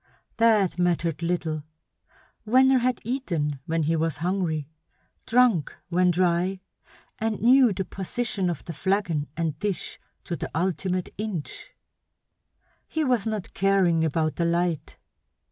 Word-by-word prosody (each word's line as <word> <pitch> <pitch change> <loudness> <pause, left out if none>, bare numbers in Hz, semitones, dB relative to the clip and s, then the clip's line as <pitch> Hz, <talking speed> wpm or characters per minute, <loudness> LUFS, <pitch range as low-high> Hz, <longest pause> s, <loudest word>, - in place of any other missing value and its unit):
That 215 -6 +3
mattered 175 -2 0
little; 165 -3 -1 0.9
Venner 260 +3 +5
had 250 0 0
eaten 170 - -2
when 165 0 0
he 160 +2 +1
was 160 -2 -1
hungry, 165 -3 -1 0.6
drunk 230 - +3
when 180 +1 +3
dry, 180 +1 +1 0.6
and 220 -1 -1
knew 250 +1 +6
the 190 0 -2
position 195 0 -2
of 170 - -5
the 170 - -5
flagon 175 -4 0
and 160 -3 -2
dish 205 -3 -3 0.2
to 175 - -4
the - - -5
ultimate 180 +1 -1
inch. 205 -8 -5 1.2
He 315 - -1
was 245 -6 +1
not 215 -4 -4
caring 190 -4 +3
about 155 0 0
the 170 - +1
light. 170 -1 -1
180 Hz, 130 wpm, -25 LUFS, 165-215 Hz, 1.2 s, knew